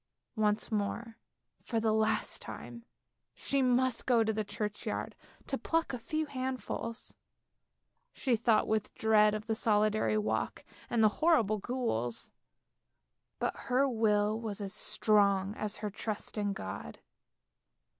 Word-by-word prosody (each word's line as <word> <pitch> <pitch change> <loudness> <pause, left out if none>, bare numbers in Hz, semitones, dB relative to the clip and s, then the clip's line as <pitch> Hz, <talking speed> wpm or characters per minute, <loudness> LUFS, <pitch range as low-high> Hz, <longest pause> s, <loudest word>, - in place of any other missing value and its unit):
Once 210 0 +1
more, 225 +2 -2 0.4
for 230 - -1
the 220 0 +2
last 220 0 0
time, 235 -1 -8 0.5
she 275 -1 0
must 255 0 +2
go 240 -3 +5
to 220 0 0
the 215 0 -1
churchyard 210 0 -4 0.3
to - - -3
pluck 330 -4 0
a 250 - -3
few 310 +6 -2
handfuls. 255 -4 -4 1.0
She 255 -4 +1
thought 225 -1 +3
with 220 -1 -1
dread 215 -1 +4
of 215 0 -5
the 225 - 0
solitary 215 0 +2
walk 215 - -1 0.2
and 230 -2 +2
the 215 - +7
horrible 235 -11 +4
ghouls; 190 - -2 1.1
but - - -1
her 260 +3 +4
will 215 -3 +2
was 215 -3 -4
as 200 -1 -4
strong 200 -2 +2
as 215 -1 -3
her 210 - -2
trust 215 0 -4
in 205 -2 0
God. 95 - -6
220 Hz, 135 wpm, -32 LUFS, 210-240 Hz, 1.1 s, the